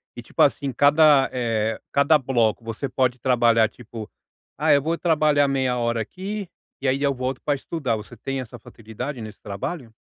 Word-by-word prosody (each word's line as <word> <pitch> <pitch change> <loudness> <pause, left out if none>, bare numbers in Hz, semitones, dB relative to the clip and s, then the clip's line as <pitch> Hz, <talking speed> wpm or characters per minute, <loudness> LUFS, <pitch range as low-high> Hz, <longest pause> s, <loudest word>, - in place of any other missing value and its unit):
E - - -7
tipo - - -3
assim, 140 -2 +2
cada, 145 0 +5
eh, 115 -3 -1
cada 140 +2 +4
bloco 120 -5 0
você 115 +5 -4
pode 130 -1 0
trabalhar 115 -3 +3
tipo: 115 -1 -10 0.5
"Ah, - - +3
eu 140 - +4
vou 165 +3 -1
trabalhar 155 -4 +3
meia 130 -2 0
hora 115 -1 0
aqui, 195 - -6 0.3
e 135 - -1
aí 135 +2 +1
eu 140 -1 +2
volto 130 0 -4
pra 145 -1 +1
estudar". 135 -4 -2
Você 110 +2 -9
tem 135 +2 -4
essa 120 -1 -10
facilidade 115 +5 -7
nesse 110 -1 -9
trabalho? 115 - -6
130 Hz, 180 wpm, -23 LUFS, 115-145 Hz, 0.5 s, cada